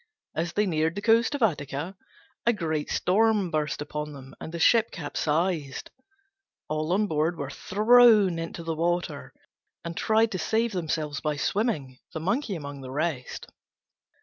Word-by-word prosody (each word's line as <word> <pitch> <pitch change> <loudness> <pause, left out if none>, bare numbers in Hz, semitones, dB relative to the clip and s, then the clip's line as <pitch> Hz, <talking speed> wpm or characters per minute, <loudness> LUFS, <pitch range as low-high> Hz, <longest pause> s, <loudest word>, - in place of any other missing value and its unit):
As 165 +1 -2
they 210 - +2
neared 160 -2 0
the 200 - -3
coast 230 +5 +4
of 275 - -1
Attica 150 -1 -1 0.5
a 235 - +5
great 160 -6 -2
storm 205 -1 +2
burst 150 -2 -1
upon 150 0 -5
them, 135 -1 -11
and 160 - -6
the 170 - -5
ship 225 +6 +4
capsized. 155 -2 -2 0.8
All 155 +2 -2
on 210 +3 +2
board 160 -1 0
were 140 -1 -4
thrown 210 - +5
into 165 0 -5
the 165 0 -2
water, 170 -2 -2 0.5
and 170 0 -5
tried 220 +3 +2
to 185 - -3
save 225 +6 +1
themselves 155 -5 -2
by 150 -1 -1
swimming, 150 - -1
the 160 - -3
Monkey 210 - -1
among 140 -3 -7
the 130 - -8
rest. 145 -2 -3
165 Hz, 155 wpm, -27 LUFS, 150-210 Hz, 0.8 s, a